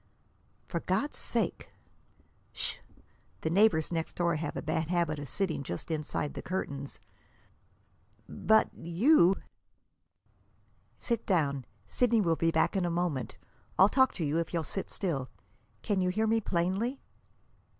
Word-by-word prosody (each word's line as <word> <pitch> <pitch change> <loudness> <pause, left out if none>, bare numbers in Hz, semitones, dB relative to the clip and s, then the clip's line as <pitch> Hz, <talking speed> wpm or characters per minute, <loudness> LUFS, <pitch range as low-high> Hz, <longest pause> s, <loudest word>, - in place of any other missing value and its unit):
"For 170 - -3
God's 190 - -1
sake!" - - -2 0.8
"Sh! - - -3 0.6
The 160 - -1
neighbors 180 -5 +4
next 165 -1 -2
door 170 -2 +1
have 150 -1 -4
a - - -2
bad 160 0 -1
habit 170 -3 0
of 145 -2 -7
sitting 185 -4 -1
just 110 - -5
inside 150 -1 -2
the - - -6
curtains." 140 -7 -4 1.3
"But 220 0 +3
you!" 185 - +4 1.6
"Sit 235 -2 -2
down. 140 - +1 0.2
Sidney 230 - +2
will 170 -5 +2
be 165 +1 +1
back 160 +4 +2
in 190 - +1
a 175 - +1
moment. 165 -8 -2 0.4
I'll 190 +2 +7
talk 260 +1 +4
to 165 - -2
you, 150 +3 +1
if 170 +1 -3
you'll 165 - 0
sit 195 +6 -4
still. 140 -9 -2 0.5
Can 200 -3 +1
you 180 - +2
hear 215 +4 +1
me 225 +1 +2
plainly?" 195 +9 -1
170 Hz, 140 wpm, -30 LUFS, 160-200 Hz, 1.6 s, I'll